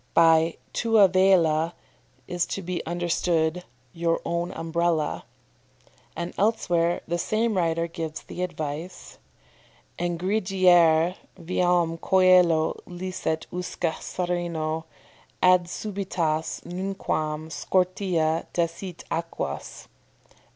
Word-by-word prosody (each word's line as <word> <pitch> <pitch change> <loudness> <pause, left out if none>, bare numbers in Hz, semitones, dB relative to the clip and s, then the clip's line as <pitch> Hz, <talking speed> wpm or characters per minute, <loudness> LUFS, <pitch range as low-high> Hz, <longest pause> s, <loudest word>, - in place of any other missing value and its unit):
"] - - -39
By 165 0 +5 0.2
tua 225 -4 +5
vela 175 -3 +3 0.5
is 175 0 -1
to 195 - -4
be 175 -1 -3
understood 170 0 0 0.3
"your 165 0 0
own 170 +1 -1
Umbrella." 165 -1 -1 0.9
And 170 +1 -4
elsewhere 175 -5 +1
the 170 +1 -1
same 220 +4 0
writer 165 -2 +1
gives 165 -2 -6
the 180 - -7
advice: 165 0 -5 0.8
"Ingrediare 175 -2 +3 0.2
viam 175 -1 +1
coelo 180 -4 +4
licet 175 -3 -3
usque 180 -2 -2
sereno 170 -3 -2 0.5
Ad 180 -1 +5
subitas 175 -5 -2
nunquam 160 -4 -3
scortea 180 -3 0
desit 170 +1 -3
aquas." 165 0 -4
175 Hz, 90 wpm, -25 LUFS, 165-185 Hz, 0.9 s, By